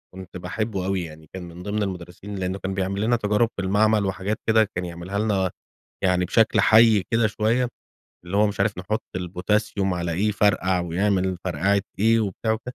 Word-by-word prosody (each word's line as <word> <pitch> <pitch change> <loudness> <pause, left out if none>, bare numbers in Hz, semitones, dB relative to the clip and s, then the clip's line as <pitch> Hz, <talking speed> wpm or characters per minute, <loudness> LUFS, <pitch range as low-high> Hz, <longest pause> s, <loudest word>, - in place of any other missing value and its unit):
كنت 95 -1 -9
باحبه 95 +2 -3
أوي 95 -1 -1
يعني 80 -1 -11
كان 95 -1 -6
من 85 +1 -10
ضمن 105 +1 -1
المدرسين 95 +1 -6
لأنه 95 0 -3
كان 95 0 -3
بيعمل 95 +1 -2
لنا 115 +3 +2
تجارب 105 +1 +1
في 100 - -1
المعمل 105 +1 +3
وحاجات 95 +2 -2
كده 110 0 +5
كان 90 0 -2
يعملها 85 +3 -5
لنا 100 -4 +1 0.5
يعني 90 -1 +3
بشكل 110 +5 +3
حي 110 -2 +6
كده 115 0 +3
شوية، 110 +4 +1 0.6
اللي 90 +3 -3
هو 105 - +5
مش 105 - -4
عارف 100 -4 +1
نحط 105 +5 -2 0.2
الPotassium 95 +2 -1
على 85 -1 -2
إيه 100 +6 +1
يفرقع 95 -3 +2
ويعمل 95 +1 0
فرقعة 95 +3 +1 0.2
إيه 115 +3 +4
وبتاع. 110 +2 -1
وك 110 - -2
100 Hz, 185 wpm, -24 LUFS, 90-105 Hz, 0.6 s, حي